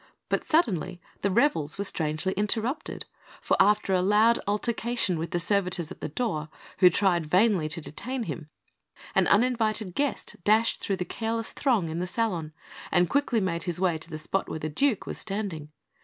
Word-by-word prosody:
But - - 0
suddenly 185 - +1 0.2
the 200 - +1
revels 185 - +1
were 200 - -1
strangely 160 0 0
interrupted, 225 - -1 0.3
for - - +1
after 205 -2 +3
a 185 - +3
loud 210 +5 +4
altercation 215 -3 0
with 165 0 -3
the 175 - -1
servitors 180 -3 0
at - - -10
the - - -3
door, 155 -5 -2 0.3
who 180 - +8
vainly 175 -3 +1
tried 185 -3 +3
to 165 - -5
detain 250 - -4
him, 150 -4 -6 0.6
an - - +3
uninvited 220 -3 +2
guest 285 +6 -2
dashed 220 +3 +3
through 195 - -1
the 180 - -3
careless 225 +2 -2
throng 235 - +1
in 160 +1 -4
the 180 - -2
salon, 180 -5 -1 0.4
and 175 -1 +3
quickly 280 -5 +2
made 170 -4 -2
his 175 -2 -3
way 175 -4 +1
to 160 - -11
the 155 - -5
spot 175 +5 -2
where - - -3
the 155 0 -4
Duke 250 - +1
was - - -4
standing. 195 -8 -4
195 Hz, 180 wpm, -27 LUFS, 170-225 Hz, 0.6 s, who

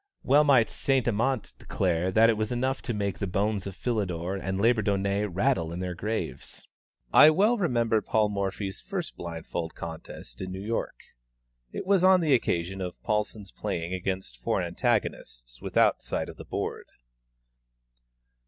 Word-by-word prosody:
Well 145 +3 +5
might 135 -6 +5
Saint 135 -3 0
Amant 120 +1 0
declare 90 -1 0
that 110 +4 +6
it 115 - +4
was 110 +1 -2
enough 130 +2 -1
to 125 - -3
make 100 -2 -2
the 100 - -2
bones 100 +1 -1
of 95 - -7
Philidor 95 -6 -2
and 95 0 -3
Labourdonnais 100 -3 +2
rattle 95 -3 0
in 85 - -5
their 90 -1 -3
graves! 110 +5 -5 0.5
I 150 - +9
well 205 +9 +4
remember 120 - +1
Paul 110 -1 +1
Morphy's 100 -1 -3
first 185 -5 -5
blindfold 85 -1 -5
contest 80 -7 -8
in 95 0 -4
New 95 - -5
York. 115 +1 -2 0.8
It - - -5
was 190 -1 +3
on 185 -1 +6
the 155 -4 +3
occasion 95 -5 0
of 90 -1 -5
Paulsen's 105 -2 -2
playing 85 +2 -3
against 95 -7 -3
four - - 0
antagonists - - -2
without - - +2
sight - - -3
of - - -10
the - - -9
board. - - -4
100 Hz, 155 wpm, -27 LUFS, 90-120 Hz, 0.8 s, I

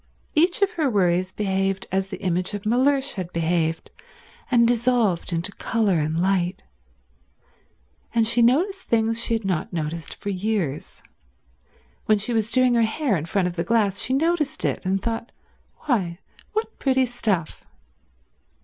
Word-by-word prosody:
Each 345 +5 +3
of 400 - +2
her 315 -8 0
worries 185 -3 +1
behaved 195 -1 -1
as 190 +1 0
the - - -7
image 185 +2 -1
of 205 - -7
Mellersh 270 +4 +2
had 180 -3 -5
behaved, 165 -1 -1 0.6
and 235 -2 +4
dissolved 235 -7 +1
into 170 +4 -1
colour 200 -4 0
and 155 +2 -1
light. 185 0 0 1.5
And 230 -1 +2
she 235 +2 +3
noticed 360 - +2
things 230 0 +1
she 230 - 0
had 225 -2 -4
not 180 -5 -1
noticed 160 -2 -4
for 205 - -4
years—when 135 - -4
she 215 +4 -3
was 220 -1 0
doing 255 0 +3
her 235 - +3
hair 230 +1 +1
in 160 -1 -3
front 185 +1 +1
of 175 - -5
the 170 - -1
glass 210 -3 +1
she 255 - -1
noticed 315 -1 0
it, - - -1
and 195 +1 +1
thought, 230 +3 -4 0.5
"Why, 195 - 0 0.4
what 440 +1 -3
pretty 265 -1 +2
stuff." 210 -9 -1
205 Hz, 150 wpm, -23 LUFS, 175-240 Hz, 1.5 s, and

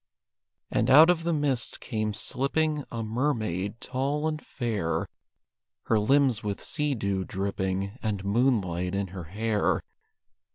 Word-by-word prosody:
And 115 - +1
out 155 +6 +9
of 170 -2 0
the 170 - 0
mist 145 -6 -1
came 110 -1 -2
slipping 150 +5 0
A 115 -1 -3
mermaid, 110 - -1
tall 140 +5 -1
and 155 -1 -2
fair; 110 -10 -2 0.8
Her 110 - +2
limbs 130 0 +3
with 100 -1 -2
sea 150 -2 -1
dew 100 -4 -1
dripping, 95 +2 -2
And 100 -3 -2
moonlight 100 -6 +1
in 100 -1 -1
her 90 -2 -7
hair. 105 +4 0
110 Hz, 130 wpm, -27 LUFS, 100-140 Hz, 0.8 s, out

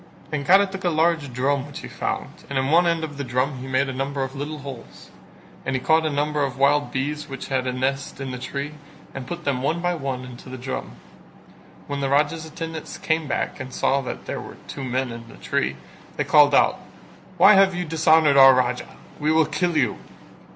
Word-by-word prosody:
And 145 -2 -3
Kara 195 +2 +7
took 195 0 -7
up 175 - +2
a - - -2
large 160 -3 +2
drum 135 +2 0
which 145 - -9
he - - -7
found - - -4
and 140 - -2
in 135 +2 0
one 170 +2 +5
end 165 -1 +1
of 145 -3 -6
the - - -1
drum 130 +2 -1
he 130 - -7
made 130 +1 +1
a 135 - -4
number 135 +1 -2
of 135 +1 -6
little 145 +3 -4
holes: 135 -4 -10 0.5
and 130 - -2
he - - +1
caught 160 +4 +3
a - - +1
number 150 0 0
of 135 -2 -3
wild 145 +2 +3
bees 150 +3 -3
which 135 -1 -7
had 130 -1 0
a - - 0
nest 135 +3 -2
in 135 -1 -4
the 125 - -5
tree 140 +3 -4 0.4
and 130 -2 -7
put 175 0 -6
them 135 -4 -1
one 155 +5 0
by 175 +1 0
one 135 -5 -4
into 125 0 -11
the 130 - -7
drum. 130 +1 -5 0.9
When 140 0 -4
the 135 -1 -1
Raja's 150 +3 +1
attendants 160 0 -6
came 160 -1 -1
back - - -2
and 130 0 -6
saw 140 +2 +1
that 130 - -6
there - - -4
were - - -10
two 135 - -6
men 130 0 -1
in 115 0 -9
the - - -13
tree, 65 +1 -1 0.4
they - - +1
called 145 -2 +5
out: - - +4 0.6
"Why 195 +4 +8
have 195 -1 +5
you 180 0 -2
dishonoured 160 -2 +4
our 135 -1 +9
Raja? 125 0 -1 0.2
We 150 +1 +1
will 160 0 +4
kill 155 +3 -1
you." - - +1
140 Hz, 225 wpm, -23 LUFS, 130-160 Hz, 0.9 s, our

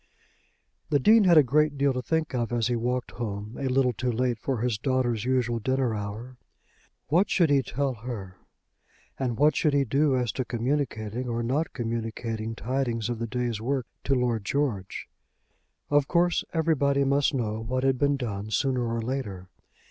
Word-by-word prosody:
The 150 - +4
Dean 215 - +5
had 175 -3 +6
a 150 - +8
great 150 +3 +2
deal 140 0 +2
to 125 - -2
think 160 +2 -1
of 120 -2 -1
as 120 -2 +1
he 120 +1 +1
walked 125 +2 -2
home 105 -1 -5
a 135 - -1
little 130 -1 +2
too 125 +3 -1
late 120 0 0
for 125 0 -2
his 120 -4 0
daughter's 120 -4 0
usual 125 -2 +1
dinner 130 +1 0
hour. 110 +5 -6 0.7
What 175 +7 +3
should 170 -5 +3
he 140 -1 +5
tell 135 +1 -2
her; 110 -6 -7 0.8
and 125 -4 -1
what 150 +2 +4
should 150 -2 +2
he 140 -1 +3
do 135 +2 +2
as 125 -2 0
to 130 - -2
communicating 120 -2 -2
or 120 0 -1
not 140 +7 0
communicating 115 -1 -3
tidings 120 -3 -2
of 120 -2 -3
the 115 - -2
day's 120 -2 -2
work 130 +1 -1 0.2
to 135 - +2
Lord 120 -4 0
George? 115 -6 -2 0.8
Of 145 -1 +4
course 175 0 +2
everybody 145 -4 +2
must 140 +1 +2
know 110 -3 -2
what 130 +3 -2
had 135 -2 +2
been 140 0 +2
done 105 -5 -4
sooner 125 +2 0
or 115 -1 -2
later. 105 -8 -4
125 Hz, 180 wpm, -27 LUFS, 115-140 Hz, 0.8 s, a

